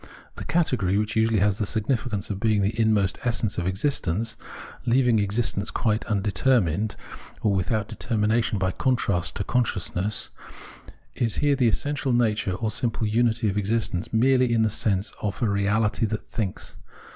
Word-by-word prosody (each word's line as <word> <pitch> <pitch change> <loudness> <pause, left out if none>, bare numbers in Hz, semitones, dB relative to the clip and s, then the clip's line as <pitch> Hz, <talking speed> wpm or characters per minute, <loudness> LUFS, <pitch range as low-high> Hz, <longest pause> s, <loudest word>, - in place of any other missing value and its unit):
The - - -6
category, 125 - +1
which 105 +1 -1
usually 110 -2 +2
had 105 0 +4
the 100 +2 -2
significance 110 -3 -1
of 95 - -4
being 105 -2 +2
the 100 +3 +1
inmost 105 -4 +2
essence 115 -4 -1
of 90 - -2
existence 110 - 0 0.3
— - - -15
leaving 120 -2 +3
existence 100 0 -1
quite 110 -1 -1
undeter 105 +4 +2
mined, 100 +4 -1 0.5
or 105 - +3
without 105 +3 -1
determination 110 -1 0
by 95 -1 0
contrast 100 -8 0
to 100 - -1
con 125 +4 +2
sciousness 100 0 -2 0.4
— - - -21
is 115 -3 +1
here 145 -1 +2
the 130 -3 +2
essential 135 +3 0
natm'e 105 -5 +1
or 110 - +1
simple 115 0 -1
imity 115 +1 +1
of 105 0 0
existence 105 -3 -1
merely 125 +2 +3
in 115 -1 +3
the 110 - +1
sense 100 -1 -1
of 105 -1 -3
a - - +4
reaUty 105 +2 +1
that 105 - -4
thinks. 105 -6 -4
110 Hz, 170 wpm, -25 LUFS, 100-120 Hz, 0.5 s, had